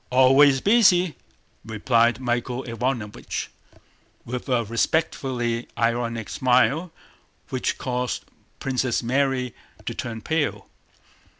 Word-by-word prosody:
"Always 135 +2 +5
busy," 190 -6 +4 0.5
replied 115 +1 +2
Michael 120 0 -2
Ivánovich 115 -2 -3 0.8
with 125 +3 -5
a 125 -2 +2
respectfully 120 -1 -1
ironic 115 -1 -1
smile 130 - +2 0.6
which 130 - -1
caused 125 -1 -3 0.3
Princess 125 -2 -1
Mary 130 -1 0 0.3
to - - -3
turn 115 -2 -5
pale. 160 +2 -1
125 Hz, 90 wpm, -24 LUFS, 115-135 Hz, 0.8 s, Always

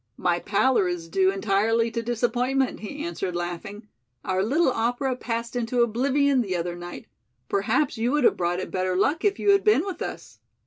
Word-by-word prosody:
"My 175 -1 +1
pallor 205 +1 +2
is 175 -2 -4
due 190 +3 +2
entirely 215 +4 +1
to 230 0 -2
disappointment," 245 +3 0
he 285 +8 -6
answered 190 - -4
laughing, 175 +5 -5 0.4
"our 185 0 0
little 270 - +2
opera 245 +3 -1
passed 235 -1 -4
into 240 0 +1
oblivion 270 +4 +2
the 190 -5 -2
other 175 0 -2
night. 175 0 -8 0.4
Perhaps 225 +6 0
you 235 +2 +1
would 295 -2 +2
have - - +5
brought 175 0 -1
it 185 - -5
better 185 0 -1
luck 290 - +1
if 405 -1 +2
you 405 - +3
had 395 -1 +4
been 425 -6 +4
with 385 -3 -6
us." - - -7
230 Hz, 185 wpm, -25 LUFS, 190-265 Hz, 0.4 s, have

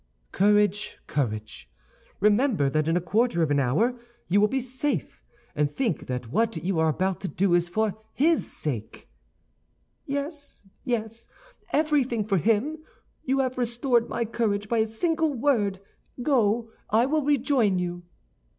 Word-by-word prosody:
"Courage, 205 0 +2
courage! 110 - -3 0.5
remember 210 - +3
that 155 +1 0
in 165 +2 +2
a - - +2
quarter 205 0 +1
of 150 - 0
an 145 - +3
hour 215 - +1 0.3
you 200 +3 +3
will 210 - +5
be 265 +5 -1
safe; 260 +3 -3 0.3
and 150 -1 +1
think 220 - -2
that 125 -2 -4
what 225 - +1
you 180 -1 -1
are 160 0 +3
about 185 +3 -1
to 195 - -3
do 180 +3 +1
is 175 0 +2
for 215 +2 0 0.2
his 320 +4 +2
sake." 120 -8 -5 1.0
"Yes, 285 - -5 0.2
yes, 230 -2 -3 0.4
everything 280 -8 +1
for 200 -3 +1
him. 230 - +1 0.5
You 270 +1 +2
have 255 -1 -2
restored 240 0 +1
my 235 - -1
courage 210 -2 -1
by 230 +1 +1
a 220 - +2
single 320 +6 0
word; 225 -7 +1 0.4
go, 230 -4 +1 0.2
I 225 +3 +4
will 305 +3 +1
rejoin 270 -8 +2
you." 175 0 -3
220 Hz, 150 wpm, -26 LUFS, 180-255 Hz, 1.0 s, will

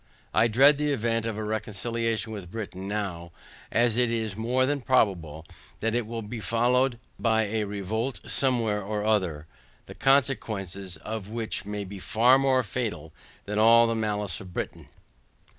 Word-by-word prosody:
I 115 - +4
dread 140 +6 +5
the 150 0 +1
event 115 -3 0
of 110 -2 -3
a 110 - -3
reconciliation 110 +1 -2
with 95 -5 -7
Britain 95 -2 -6
now, 95 -5 -4 0.4
as 120 -1 +2
it 125 -1 +3
is 110 -4 -2
more 125 +4 +1
than 145 +1 -1
probable, 85 - +1 0.3
that 115 0 -1
it 120 -2 -1
will 115 -2 -5
followed 120 +3 +2 0.2
by 110 -1 +2
a 105 0 -1
revolt 105 +5 -3
somewhere 115 -6 +1
or 105 +1 -3
other, 90 -9 0 0.4
the - - -10
consequences 100 - 0
of 105 +3 -6
which 115 -2 -3
may 105 0 -4
be 100 +1 -8
far 120 +7 +4
more 130 -1 +3
fatal 100 -9 -4 0.3
than 105 +1 -2
all 115 +2 +7
the 115 - 0
malice 105 -4 -2
of 90 -2 -11
Britain. - - -5
110 Hz, 160 wpm, -27 LUFS, 100-120 Hz, 0.4 s, all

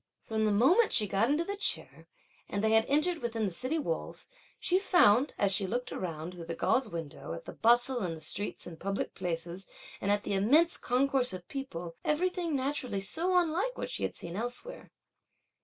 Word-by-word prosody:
From 220 -1 -1
the 215 - +2
moment 305 - +4
she 215 - +6
got 205 +4 +1
into 300 +4 +2
the 400 - -3
chair, 405 - 0 0.4
and 200 +1 -2
they 220 - +3
had 225 0 +4
entered 310 +4 +2
within 230 -3 -2
the 195 - -2
city 255 - -2
walls, 405 +11 -3 0.3
she 365 +1 +2
found, 280 - +4
as 200 -1 +2
she 195 0 +3
looked 245 +5 -3
around, 165 -1 -5
through 175 -2 -8
the 165 - -4
gauze 255 +6 +1
window, 165 - -6
at 85 - -8
the - - -8
bustle 240 +2 +3
in 175 -4 -2
the - - -10
streets 200 +6 -4
and 165 -2 -10
public 195 +1 -3
places 175 +2 -5 0.3
and 200 - -1
at 205 0 +2
the - - -2
immense 285 - +4
concourse 260 -2 +1
of 180 -1 -8
people, 175 -12 -6
everything 345 0 0
naturally 260 -6 -1
so 340 - 0
unlike 360 +9 0
what - - -4
she - - -3
had - - -2
seen 170 0 -7
elsewhere. 245 - -4
230 Hz, 195 wpm, -30 LUFS, 190-300 Hz, 0.4 s, she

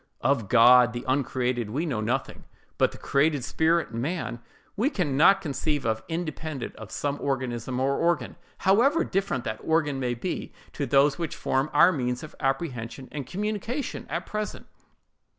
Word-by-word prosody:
Of 120 -6 +1
God, 125 0 +7
the 120 0 -5
uncreated, 125 -3 0
we 145 +10 -2
know 130 -9 -2
nothing; 130 +5 -2 0.3
but - - +4
the - - -11
created 145 -1 +1
spirit, 160 +1 +1
man, 125 +1 -3 0.4
we 230 +7 +2
can 175 - -1
not 195 +7 +6
conceive 150 -3 -2
of 110 -1 0
independent 155 -4 -4
of 110 - -10
some 145 +5 -2
organism 130 -2 -2
or 135 +1 +1
organ, 165 -7 0 0.2
however 255 - +3
different 190 -10 -1
that 110 0 -4
organ 155 -4 +1
may 125 -2 -1
be 175 +10 -4 0.2
to 140 - -3
those 140 +4 +4
which 165 -4 -3
form 135 +3 0
our 150 +5 +6
means 125 -5 -2
of 155 - -9
apprehension 135 -3 -3
and 140 -4 -5
communication 215 +7 -3
at - - -3
present. 210 0 -4
140 Hz, 160 wpm, -26 LUFS, 125-165 Hz, 0.4 s, God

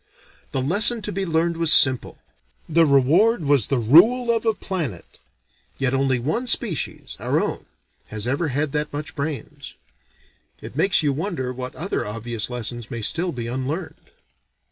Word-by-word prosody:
The 130 - -1
lesson 210 - +4
to 210 - -3
be 195 0 -3
learned 165 +1 0
was 165 -2 +2
simple: 130 -5 +3 0.5
the 165 0 +3
reward 160 - +3
was 140 -6 +3
the 135 - 0
rule 205 - +5
of 230 0 -2
a 220 - +2
planet. 160 - -5 0.6
Yet 135 -1 0
only 135 -1 +1
one 155 - -2
species, 210 -9 -2
our - - 0
own, - - -3 0.4
has 110 0 -1
ever 140 +7 0
had 145 +1 -1
that 150 0 -2
much 150 +4 -6
brains. 145 -1 -6 0.8
It - - -10
makes 165 +2 +2
you 145 -2 +1
wonder 145 -5 -3
what 125 0 -7
other 195 +5 -3
obvious 115 +1 -3
lessons 120 -1 -5
may 115 -2 -5
still 175 - 0
be 120 -5 -5
unlearned. 130 +8 -5
145 Hz, 160 wpm, -22 LUFS, 130-175 Hz, 0.8 s, rule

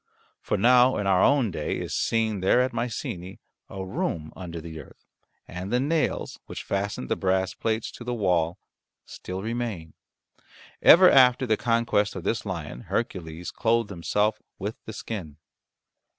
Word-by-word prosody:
For - - -1
now 125 +4 +5
in 105 - -2
our 95 -1 +3
own 135 -7 +3
day 75 -3 -3
is - - -5
seen 110 -3 0
there 95 +6 +3
at 130 0 0
Mycenae 100 -6 -4 0.3
a 95 -1 -6
room 80 -4 -3
under 85 -3 -7
the 80 -1 -8
earth, - - -15 0.4
and 90 +3 -6
the 125 - +2
nails 150 +4 -1
which - - -6
fastened 100 +1 -3
the - - 0
brass 95 0 0
plates 110 0 -2
to - - -10
the 125 - -4
wall 90 -5 +1 0.5
still 95 +1 -7
remain. 110 -9 -4 0.9
Ever 185 +2 +9
after 130 -1 +5
the 110 -3 +2
conquest 115 -3 +1
of 95 - -6
this 110 +2 -1
lion 80 -9 -6
Hercules 90 -6 -3
clothed 115 -2 +1
himself 105 +4 0 0.2
with 105 +3 -4
the 110 - -7
skin. 95 -9 -6
100 Hz, 155 wpm, -26 LUFS, 90-115 Hz, 0.9 s, Ever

